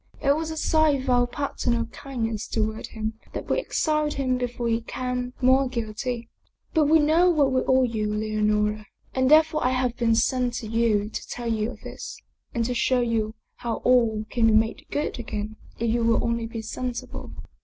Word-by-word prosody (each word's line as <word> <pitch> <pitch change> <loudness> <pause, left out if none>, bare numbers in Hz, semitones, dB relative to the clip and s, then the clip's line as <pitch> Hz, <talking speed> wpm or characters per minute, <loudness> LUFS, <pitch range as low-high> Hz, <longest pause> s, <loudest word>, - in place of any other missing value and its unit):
It 280 0 +3
was 320 +1 -2
a 320 - -5
sign 310 -4 +3
of 260 - 0
our 245 0 +4
paternal 240 -3 -1
kindness 230 -3 -4
toward 220 0 -2
him 220 0 -5
that - - -5
we - - +1
exiled 305 -9 0
him 260 -2 +1
before 245 -1 -2
he 230 0 +2
became 250 +1 -4
more 260 +1 +4
guilty. 235 0 -3 0.5
But 315 -3 +4
we 315 +2 +6
know 320 +4 +4
what 295 -6 +3
we 260 0 +2
owe 260 0 +5
you, 220 -3 -1
Leonora. 210 0 0 0.3
And 260 0 +2
therefore 310 0 +5
I 250 - +3
have 255 -2 0
been 230 -1 +3
sent 250 +1 +1
to 230 - -4
you 220 -2 +2
to - - -6
tell 240 - -6
you 215 0 -1
of - - -10
this, - - -8 0.3
and 230 -1 -1
to 250 - -1
show 245 +2 +2
you 225 -2 0 0.2
how 235 -2 -2
all 230 -4 +3
can 230 -2 +3
be 220 - +4
made 220 +1 +1
good 290 -3 -2
again 215 -2 -5 0.2
if 230 0 0
you 235 0 +1
will 230 0 +3
only 235 -1 -1
be 225 -1 -6
sensible." 250 +2 -5
240 Hz, 195 wpm, -25 LUFS, 225-260 Hz, 0.5 s, we